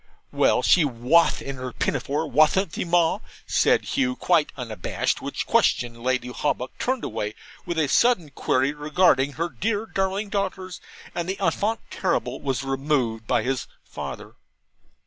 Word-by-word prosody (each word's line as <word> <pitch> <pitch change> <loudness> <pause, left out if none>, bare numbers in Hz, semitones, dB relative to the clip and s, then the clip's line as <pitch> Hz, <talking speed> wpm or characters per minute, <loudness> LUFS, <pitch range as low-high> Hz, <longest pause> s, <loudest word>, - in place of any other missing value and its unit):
'Well, - - +2
she 180 - +5
WATH 135 +5 +2
in 140 -1 -5
her 130 0 -5
pinnafaw, 145 +5 -1
wathn't 155 +5 +3
she, - - -2
Ma?' 175 +1 +2 0.3
says - - +3
Hugh, 260 -2 +1
quite 170 - +2
unabashed; 115 -7 -2
which - - -4
question 120 -1 +1
Lady 130 0 0
Hawbuck 125 0 -2
turned 260 -1 -1
away 105 +1 -3 0.3
with 170 - -2
a 155 -2 +2
sudden 175 - +3
query 135 +1 +1
regarding 150 -2 +2
her 165 +4 -1
dear 205 - -2
darling 195 0 -2
daughters, 190 -2 -3 0.3
and 175 0 -3
the 195 - -2
ENFANT 200 +5 0
TERRIBLE - - -1
was 135 -1 -2
removed 135 -5 -1
by - - +2
his 130 -1 -2 0.2
father. - - -7
150 Hz, 145 wpm, -24 LUFS, 130-185 Hz, 0.3 s, she